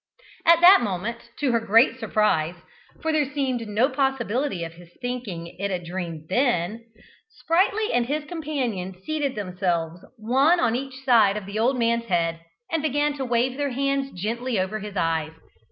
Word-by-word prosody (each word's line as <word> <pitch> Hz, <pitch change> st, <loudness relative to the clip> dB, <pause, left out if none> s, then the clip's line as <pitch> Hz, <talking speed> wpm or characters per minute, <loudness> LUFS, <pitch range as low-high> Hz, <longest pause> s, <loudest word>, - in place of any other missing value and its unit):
At 335 Hz, 0 st, +7 dB
that 365 Hz, -1 st, +9 dB
moment, 230 Hz, +3 st, -4 dB
to 275 Hz, -3 st, +2 dB
her 230 Hz, -, +2 dB
great 230 Hz, +4 st, +4 dB
surprise 180 Hz, -9 st, +1 dB, 0.5 s
(for 320 Hz, -, +1 dB
there 295 Hz, -3 st, +1 dB
seemed 260 Hz, -5 st, -2 dB
no 215 Hz, +5 st, +2 dB
possibility 265 Hz, -6 st, -1 dB
of 165 Hz, 0 st, -6 dB
his 170 Hz, 0 st, -15 dB
thinking 235 Hz, -10 st, -5 dB
it 200 Hz, +1 st, -1 dB
a 185 Hz, -, -1 dB
dream 170 Hz, -3 st, -6 dB
then) 225 Hz, -, 0 dB, 0.4 s
Sprightly 400 Hz, +3 st, +1 dB
and 240 Hz, -1 st, +2 dB
his 300 Hz, +2 st, -1 dB
companion 255 Hz, -, -3 dB
seated 295 Hz, -1 st, -2 dB
themselves 180 Hz, -4 st, -2 dB
one 265 Hz, +10 st, +3 dB
on 235 Hz, -2 st, +2 dB
each 265 Hz, +1 st, -6 dB
side 225 Hz, -6 st, +5 dB
of 210 Hz, -, -6 dB
the 200 Hz, +2 st, -4 dB
old 250 Hz, +4 st, +2 dB
man's 235 Hz, 0 st, +1 dB
head, 165 Hz, -4 st, 0 dB, 0.3 s
and 325 Hz, -1 st, 0 dB
began 295 Hz, 0 st, +1 dB
to 270 Hz, -, -3 dB
wave 245 Hz, +1 st, 0 dB
their 285 Hz, -2 st, -1 dB
hands 275 Hz, +1 st, 0 dB
gently 230 Hz, +3 st, -2 dB
over 190 Hz, +4 st, -2 dB
his 205 Hz, -1 st, -7 dB
eyes. 160 Hz, -2 st, 0 dB
235 Hz, 170 wpm, -24 LUFS, 190-275 Hz, 0.5 s, that